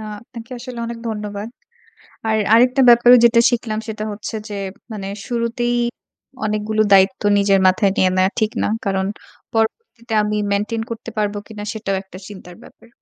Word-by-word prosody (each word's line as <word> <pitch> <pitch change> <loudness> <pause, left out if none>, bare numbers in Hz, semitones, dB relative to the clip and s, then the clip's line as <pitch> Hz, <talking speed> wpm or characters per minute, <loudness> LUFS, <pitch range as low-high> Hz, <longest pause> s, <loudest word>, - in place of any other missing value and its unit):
আ - - -7 0.2
আপনাকে 235 +1 -12
আসলে 245 0 -8
অনেক 235 0 -6
ধন্যবাদ। 210 0 -5 0.8
আর 220 0 +2 0.2
আরেকটা 250 +3 +5
ব্যাপারেও 240 +1 +7
যেটা 235 0 +5
শিখলাম 225 -3 -2
সেটা 215 -1 -5
হচ্ছে 210 +2 -6
যে 205 - -5 0.4
মানে 200 -2 -5 0.2
শুরুতেই 240 0 -1 0.7
অনেকগুলো 215 +1 0
দায়িত্ব 190 0 +4 0.2
নিজের 200 -1 +3
মাথায় 195 +1 +3
নিয়ে 185 - +4
নেওয়া 185 +1 +2
ঠিক 215 0 +1
না। - - +1 0.2
কারণ 190 -1 0 0.5
পরবর্তীতে 235 - -2
আমি 210 0 -1
মেইনটেইন 210 +3 -1
করতে 230 0 -6
পারব 210 -1 0
কিনা? 210 -2 -8
সেটাও 205 -3 -2
একটা 185 -1 -13
চিন্তার 185 -3 -11
ব্যাপার। 230 - -18
215 Hz, 155 wpm, -19 LUFS, 200-235 Hz, 0.8 s, ব্যাপারেও